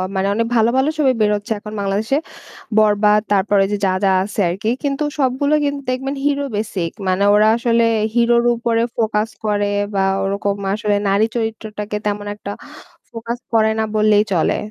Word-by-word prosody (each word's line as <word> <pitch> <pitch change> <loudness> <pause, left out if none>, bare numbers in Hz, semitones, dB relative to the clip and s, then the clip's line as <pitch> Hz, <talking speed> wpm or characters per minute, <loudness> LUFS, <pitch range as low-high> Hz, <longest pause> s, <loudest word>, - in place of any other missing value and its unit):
মানে 190 +1 0
অনেক 230 +2 0
ভালো, 225 0 +4
ভালো 270 +3 +2
ছবি 275 -4 +3
বের 210 0 +3
হচ্ছে 205 +3 -7
এখন 210 +1 -9
বাংলাদেশে। 205 +7 0 0.6
বরবাদ 210 0 +4
তারপরে 200 0 +2
ওই - - -4
যে 205 - 0
যা, 190 - +2
যা 195 - +4
আছে 205 +1 -6
আরকি। 195 +5 -2
কিন্তু 280 +1 -1 0.2
সবগুলোই 285 +3 +1
কিন্তু 285 0 -2
দেখবেন 265 +2 -2
hero 285 -1 +1
basic. 200 -6 -2 0.2
মানে 185 +1 +1
ওরা 210 +1 +5
আসলে 235 -1 +2 0.3
hero 240 0 +3
র - - -2
উপরে 230 0 0 0.2
focus 215 -1 0 0.2
করে 205 -1 +1 0.3
বা 195 - +1 0.2
ওরকম 200 +1 -1 0.2
আসলে 210 -1 0
নারী 200 +2 +3
চরিত্রটাকে 215 -2 -4
তেমন 205 0 -2
একটা 205 -1 -7 0.6
focus 230 +1 -5 0.2
করে 220 -1 +4
না 220 - +2
বললেই 210 -1 +4
চলে। 165 - +1
215 Hz, 175 wpm, -18 LUFS, 205-235 Hz, 0.6 s, ওরা